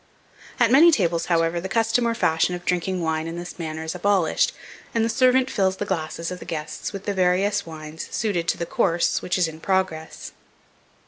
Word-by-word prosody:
At 240 -1 +4
many 305 +6 +8
tables, 170 - +1
however, 170 0 +1
the 190 - -5
custom 225 +3 +2
or 230 - 0
fashion 165 -1 +1
of 175 0 -9
drinking 180 0 -1
wine 160 0 -1
in 165 - -5
this 175 +1 -8
manner, 160 -1 -4
is 160 - -4
abolished, 185 -2 +2 0.4
and 225 -1 +3
the - - -1
servant 255 +2 +3
fills 190 -2 +1
the 205 - -3
glasses 165 -2 -3
of 180 - -6
the - - -9
guests 155 -1 -5
with 195 -1 -7
the 205 - -1
various 190 +2 +1
wines 155 0 -8
suited 185 -7 -1
to - - +1
the 170 - -3
course 170 0 +1
which 180 - -1
is 180 -2 +2
in 160 0 -9
progress. 185 -3 -2
180 Hz, 200 wpm, -23 LUFS, 165-205 Hz, 0.4 s, many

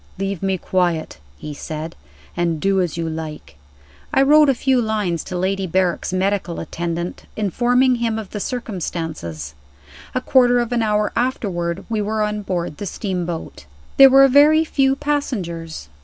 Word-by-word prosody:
"Leave 195 -1 -3
me 190 -1 0
quiet," 175 - -1 0.2
he 150 - -7
said; 155 +3 -6 0.4
"and 170 -2 0
do 195 +2 +2
as 175 -2 -2
you 165 -1 -2
like." 160 - -6 0.6
I 270 - +4
wrote 300 +1 +6
a 270 - +3
few 260 0 +2
lines 210 -7 -1
to 180 - -4
Lady 190 +1 -1
Berrick's 180 0 0
medical 185 -2 -1
attendant, 170 +1 -4
informing 245 +5 +2
him 230 -2 -1
of 215 -4 -7
the 210 - -4
circumstances. 160 - -5 0.6
A - - +2
quarter 245 -2 +4
of 240 -1 -1
an 240 -1 +1
hour 210 -1 +1
afterward 185 -9 -2
we 220 -2 -1
were 215 +1 -1
on 210 0 -2
board 175 -6 -3
the 205 - -5
steamboat. 175 - -4 0.3
There 270 0 +10
were 270 +1 +7
very 300 +4 +5
few 270 -3 +2
passengers. 185 - -3
195 Hz, 155 wpm, -20 LUFS, 170-245 Hz, 0.6 s, There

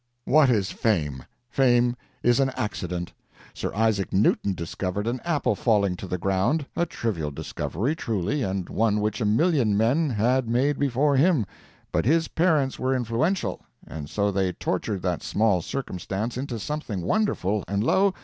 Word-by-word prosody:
'What 150 -1 +5
is 105 -6 +1
fame! 75 - 0 0.3
Fame 120 -1 +3 0.3
is 120 +2 +4
an 135 -1 +3
accident. 90 -4 -3 0.4
Sir - - -4
Isaac 110 -3 +1
Newton 100 0 +2
discovered 90 +4 -3
an 120 +2 -1
apple 165 -4 +1
falling 100 -5 +2
to 95 - -7
the 90 - -2
ground 95 - +1
a 170 - +1
trivial 95 - -2
discovery, 105 - -3
truly, 115 - -1
and 95 -5 -2
one 105 -1 +1
which 105 +3 -1
a - - +1
million 115 - +2
men 135 +9 +2
had 120 +2 +1
made 135 +4 +1
before 140 +1 +2
him 150 - +3 0.5
but - - 0
his 160 +5 +3
parents 155 -6 +1
were 130 +1 +1
influential, 125 - -1 0.2
and 75 -2 -7
so 100 0 0
they 95 -1 0
tortured 100 +2 -2
that 90 -3 -1
small 105 -4 +1
circumstance 105 0 -4
into 125 -1 -4
something 110 - -4
wonderful, 105 - 0
and, 100 +1 0
lo! 190 - +3
115 Hz, 160 wpm, -25 LUFS, 95-135 Hz, 0.5 s, What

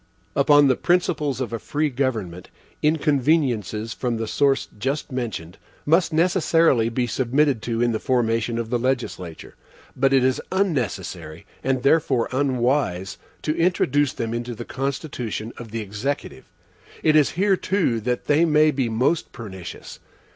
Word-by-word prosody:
Upon 145 +1 +5
the 130 - +3
principles 150 -6 0
of 125 -3 -3
a 115 - -2
free 150 +4 -1
government, 110 -10 -3 0.3
inconveniences 140 - +1
from 120 -3 -2
the 115 - -2
source 135 +4 +1
just 135 +5 -2
mentioned 110 -9 -5 0.3
must 165 +4 +3
necessarily 165 - +3
be 120 +1 -1
submitted 130 +2 +1
to 115 0 -1
in 120 - +2
the 110 - -1
formation 115 -2 0
of 115 -1 -4
the 120 - +1
legislature; 115 -10 -3 0.4
but 135 +1 +2
it 135 -2 +4
is 130 0 +1
unnecessary, 135 - -2 0.2
and 130 -1 0
therefore 140 -5 +2
unwise, 125 -8 0 0.2
to 155 - 0
introduce 145 -5 +2
them 115 0 -3
into 120 0 -4
the 120 - -7
constitution 130 -5 -4
of 120 -2 -9
the 115 +1 -4
Executive. 105 +8 -4 0.6
It 155 -1 +4
is 150 -2 +4
here 195 +1 +3
too 180 - 0
that 125 +2 -2
they 150 +3 +3
may 155 -1 +4
be 130 -4 -1
most 125 +9 0
pernicious. 95 -6 -9
130 Hz, 145 wpm, -23 LUFS, 115-150 Hz, 0.6 s, Upon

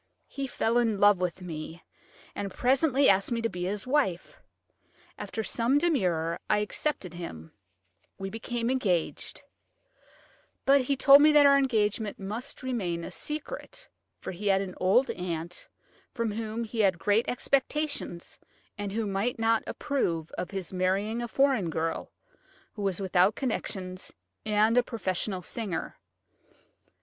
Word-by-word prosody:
He 275 -1 -4
fell 235 -1 +1
in 225 -4 +1
love 205 -2 +5
with 180 0 -2
me, 160 0 -7 0.5
and 200 - -4
presently 270 - +2
he - - +7
asked 195 +4 +1
me 235 - 0
to 230 - +1
be 180 -2 -4
his 200 +2 -2
wife. 255 - -1 0.7
After 220 - -4
some 240 +5 +2
demur, 180 - +1
I 210 - +4
accepted 210 - -2
him; 80 - -8 0.7
we 195 - -4
became 230 +2 -2
engaged, 190 -11 -1 1.2
but 275 0 +6
he 275 +2 0
told 275 +2 +8
me 305 +1 +7
that 295 -1 +7
our 280 0 +7
engagement 220 -6 +1
must 225 +8 -6
remain 190 -10 -2
a - - -6
secret, - - -6 0.3
for - - -6
he 195 +3 -5
had 195 -1 +4
an 190 -2 -4
old 210 +9 +3
aunt 175 -1 -5 0.5
from 230 -2 -1
whom 220 +1 -3
he 225 0 -6
had 195 -4 +4
great 205 +6 +2
expectations, 275 - -1 0.4
and 205 -1 -3
who 220 +2 -1
might 200 +5 -1
not 225 0 +2
approve 170 - -2
of 180 - -5
his 195 -2 -5
marrying 195 +5 0
a 240 - -3
foreign 260 -7 +2
girl, 160 +1 -3 0.6
who 210 - -7
was 195 -3 0
without 190 +1 +3
connections 190 -7 -4 0.4
and 215 +3 +4
a - - +2
professional 190 -4 -3
singer. 205 -2 -4
210 Hz, 145 wpm, -28 LUFS, 185-250 Hz, 1.2 s, told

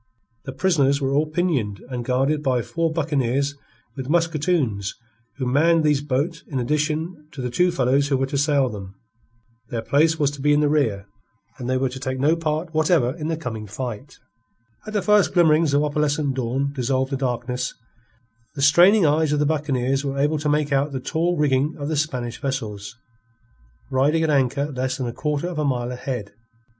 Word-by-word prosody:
The 135 - -5
prisoners 140 -4 +2
were 135 -1 -1
all 150 +2 +2
pinioned, 150 - -1
and 125 -1 -3
guarded 135 +5 +1
by 130 -5 +1
four 165 -1 -1
buccaneers 140 -3 0 0.4
with 130 -1 -6
musketoons 155 - 0 0.4
who 130 - -3
manned 160 +6 +3
these 150 -2 +2
boats 150 +4 -2
in 135 - -4
addition 150 +4 -2
to 145 - -10
the 125 -1 -3
two 180 +8 +3
fellows 135 -2 +2
who 140 -2 +1
were 135 - 0
to 140 +1 -3
sail 140 -2 +2
them. 100 -4 -8 0.7
Their 115 -2 -3
place 160 +6 +3
was 145 -3 +1
to 145 -1 -9
be 150 +1 +3
in 145 - +3
the 150 -1 +2
rear 115 -10 +1 0.5
and 125 -1 -4
they 130 - +2
were 130 0 0
to 130 +1 -8
take 130 0 -3
no 150 +5 +3
part 160 0 -2
whatever 155 -5 +2
in 155 -2 -5
the 165 -1 -1
coming 115 -8 -6
fight. 110 +1 -6 0.7
As 215 - -6
the 205 - +1
first 210 -2 +3
glimmerings 160 -3 +4
of 145 - +3
opalescent 150 -1 0
dawn 130 +2 -2
dissolved 130 0 -1
the - - 0
darkness, 125 -1 -2 0.8
the 140 - -4
straining 175 +7 +6
eyes 155 0 +2
of 150 - +2
the 150 - +2
buccaneers 135 -3 0
were 140 -1 -3
able 150 +2 +1
to 150 0 -1
make 150 0 +1
out 140 +1 +1
the 130 - -2
tall 170 +6 -1
rigging 145 0 +1
of 145 0 -4
the 160 - -1
Spanish 125 -6 -2
vessels, 110 -6 -4 1.0
riding 145 +5 +2
at 160 - +1
anchor 140 +1 +1
less 130 -1 -2
than 130 - -3
a 120 - -4
quarter 150 +4 -2
of 175 -3 -4
a - - +1
mile 125 -3 -1
ahead. 125 -4 -5
140 Hz, 195 wpm, -22 LUFS, 130-155 Hz, 1.0 s, straining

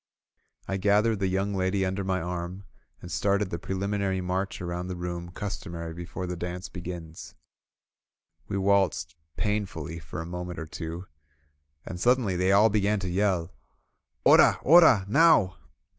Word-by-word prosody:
I 95 - -1
gathered 105 +2 +2
the 95 - +1
young 95 +2 -1
lady 95 0 0
under 95 +1 -2
my 95 -1 0
arm, 90 +2 -5 0.4
and 90 - -8
started 100 -1 0
the 85 - -3
preliminary 95 +1 -2
march 95 +1 -2
around 90 0 -4
the 90 - -4
room 85 0 -5
customary 85 -3 -6
be 85 +1 -7
fore 90 +1 -5
the 90 0 -4
dance 90 +1 -5
begins. 85 -3 -8 1.1
We 100 - -2
waltzed 95 -4 +1 0.2
painfully 95 -7 -2
for 75 -1 -8
a 80 - -4
moment 90 0 -6
or 80 - -5
two, 85 +3 -6 0.8
and 90 - -6
suddenly 120 -4 +2
they 90 +2 +2
all 105 +3 +6
began 105 0 +1
to 95 - -3
yell: 90 -3 0 0.7
''Ora! - - +7
Oral 155 - +7
Now!" 125 - +4
95 Hz, 150 wpm, -27 LUFS, 85-100 Hz, 1.1 s, Ora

